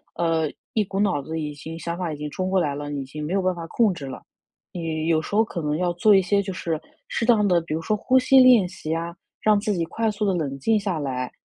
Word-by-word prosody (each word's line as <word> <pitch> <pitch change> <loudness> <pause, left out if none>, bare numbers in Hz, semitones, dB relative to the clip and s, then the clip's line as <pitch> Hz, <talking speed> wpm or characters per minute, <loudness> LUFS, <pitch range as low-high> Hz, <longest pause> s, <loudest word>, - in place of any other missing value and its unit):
呃， 165 -2 +1 0.3
一 215 - +2
股 195 0 -4
脑 190 -9 +1
子 160 +3 -4
已 150 -1 -4
经 160 +3 -8
想 170 +1 -4
法 175 -3 -3
已 - - -7
经 150 0 -5
冲 185 +5 -3
过 190 - +3
来 145 -5 0
了， 145 0 -5
已 140 -1 -3
经 150 +3 -7
没 165 - -3
有 195 - +2
办 185 -1 0
法 170 -1 -6
控 220 +3 +2
制 145 -5 -8
了。 135 - -7 0.5
你 160 -2 -3
有 165 -1 +3
时 160 - -9
候 220 - +5
可 185 -6 -5
能 150 0 0
要 180 0 0
做 205 +5 +4
一 195 - +6
些 200 +2 +1
就 190 -1 -5
是 165 -3 -3 0.3
适 230 - -2
当 220 -3 +4
的， 180 -3 +4
比 165 -1 -5
如 160 - -2
说 210 +6 0
呼 260 +5 +3
吸 265 +1 +5
练 250 -7 +7
习 160 -4 -6
呀， 170 +1 -3 0.3
让 210 -1 +4
自 210 0 -1
己 170 -3 -1
快 225 +6 -1
速 210 +1 -4
地 195 -2 +1
冷 140 -5 -3
静 220 +10 +2
下 195 -5 -2
来， 130 -3 -3
170 Hz, 300 characters per minute, -24 LUFS, 155-205 Hz, 0.5 s, 练